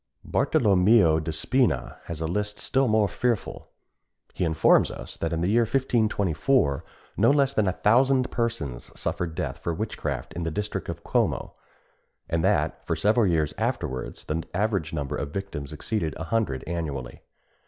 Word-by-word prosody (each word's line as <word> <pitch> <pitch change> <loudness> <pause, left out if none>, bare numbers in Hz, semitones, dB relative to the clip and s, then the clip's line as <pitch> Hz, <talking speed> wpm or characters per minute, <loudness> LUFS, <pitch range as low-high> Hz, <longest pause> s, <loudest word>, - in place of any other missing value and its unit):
Bartolomeo 95 -5 +4
de 80 +1 -3
Spina 125 +11 0
has 80 -2 -6
a - - 0
list 105 +4 -2
still 135 0 +1
more 110 -2 +3
fearful. 120 +3 -2 0.7
He - - -2
informs 80 -2 +4
us - - -8
that 80 - -2
in 85 0 -1
the 90 - +1
year 120 +2 +4
1524 110 - +1 0.3
no 110 +4 +5
less 140 -1 +3
than 110 -6 +2
a 95 - +1
thousand 130 +5 +3
persons 115 - -3
suffered 85 -2 -2
death - - -3
for 85 - -2
witchcraft 80 - -4
in 85 - -4
the 80 - -1
district 105 +6 -4
of - - -6
Como, - - 0 0.7
and 80 -1 0
that - - +1
for - - -1
several 105 +1 +3
years 80 -4 +1
afterwards 65 0 -3
the 80 +2 -2
average 100 -6 0
number 70 -4 -3
of 70 - -3
victims 80 -5 -5
exceeded 80 +1 -2
a - - -5
hundred 80 - -1
annually. 75 -7 -4
90 Hz, 160 wpm, -26 LUFS, 80-115 Hz, 0.7 s, no